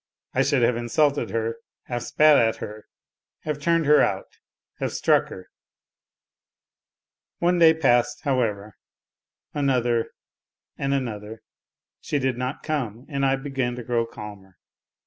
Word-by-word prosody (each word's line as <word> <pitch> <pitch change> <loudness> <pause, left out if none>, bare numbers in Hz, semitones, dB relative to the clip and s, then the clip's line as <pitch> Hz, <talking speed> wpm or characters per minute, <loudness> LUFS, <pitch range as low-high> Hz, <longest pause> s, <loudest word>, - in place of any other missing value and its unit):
I - - +2
should 140 -4 +2
have 115 0 +2
insulted 140 +5 +1
her, 115 0 -2 0.3
have 120 -1 -4
spat 155 +4 +5
at 115 -4 +3
her, 105 0 -9 0.5
have 150 -1 -3
turned 165 +1 +2
her 150 +1 +6
out, - - -2 0.4
have - - -2
struck - - +2
her! 95 - -11 1.9
One 175 +1 +2
day 160 -1 +7
passed, 120 -6 +2
however, 110 -7 -1 0.7
another 125 -5 +1 0.7
and 140 0 -1
another; 110 -4 -5 0.6
she 150 - -2
did 130 -2 0
not 125 +2 -4
come 130 -6 -3
and 140 -2 -2
I 135 0 +3
began 135 -3 -3
to 125 - -7
grow 115 -1 0
calmer. 100 -4 -11
125 Hz, 130 wpm, -24 LUFS, 115-145 Hz, 1.9 s, day